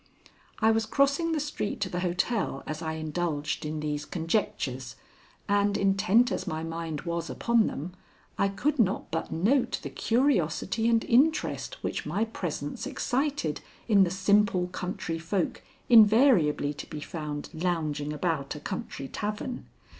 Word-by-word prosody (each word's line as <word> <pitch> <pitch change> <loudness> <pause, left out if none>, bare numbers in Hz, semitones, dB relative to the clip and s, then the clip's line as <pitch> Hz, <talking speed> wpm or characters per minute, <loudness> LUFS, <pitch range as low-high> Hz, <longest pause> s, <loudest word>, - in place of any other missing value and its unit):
I 220 +1 +4
was 225 0 +1
crossing 280 +7 +2
the 320 - +1
street 290 -8 -3
to 200 - +1
the 175 - -3
hotel 180 - -1
as 155 +1 -5
I 160 -1 -2
indulged 155 -1 -2
in 155 0 -3
these 150 -1 -2
conjectures, 160 - -2 0.5
and 205 0 +2
intent 200 +5 +3
as - - -3
my 155 +1 -3
mind 165 -2 -4
was 170 -1 -3
upon 235 -2 +2
them, 170 +6 -5 0.4
I 200 - +2
could 270 +9 -1
not 200 -4 +1
but 165 0 -3
note 240 +9 +2
the - - -5
curiosity 225 - +1
and 230 -1 +3
interest 285 +7 +1
which - - -3
my 215 +3 0
presence 160 -9 -4
excited 270 - -1 0.3
in 205 -4 +6
the 180 - +1
simple 195 0 +2
country 180 -2 -4
folk 170 +2 -1 0.3
invariably 215 - +5
to 145 - -9
be 150 - -6
found 150 -2 -5
lounging 155 -4 -1
about 150 -2 -2
a - - -6
country 135 -2 -5
tavern. 215 - -4
185 Hz, 145 wpm, -28 LUFS, 155-225 Hz, 0.5 s, in